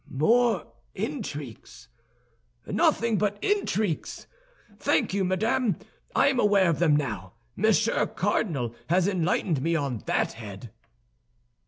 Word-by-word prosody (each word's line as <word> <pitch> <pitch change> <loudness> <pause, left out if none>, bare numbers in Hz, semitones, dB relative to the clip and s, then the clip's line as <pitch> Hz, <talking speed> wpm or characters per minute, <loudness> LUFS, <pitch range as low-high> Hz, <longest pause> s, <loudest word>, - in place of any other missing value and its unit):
"More 230 - +2 0.3
intrigues! 150 - -6 0.8
Nothing 230 -3 +2
but 205 -1 0
intrigues! 220 - -1 0.5
Thank - - +1
you, 200 -1 +1
madame, 210 +5 +1 0.4
I 280 - +5
am 265 -3 0
aware 200 -5 +4
of 165 - -2
them 160 -4 +4
now; 110 -11 -3 0.2
Monsieur 220 +2 +2
Cardinal 160 - -1 0.2
has 180 +2 +3
enlightened 175 -5 0
me 165 +3 +1
on 140 -7 -1
that - - 0
head." 105 0 -9
185 Hz, 115 wpm, -26 LUFS, 145-220 Hz, 0.8 s, I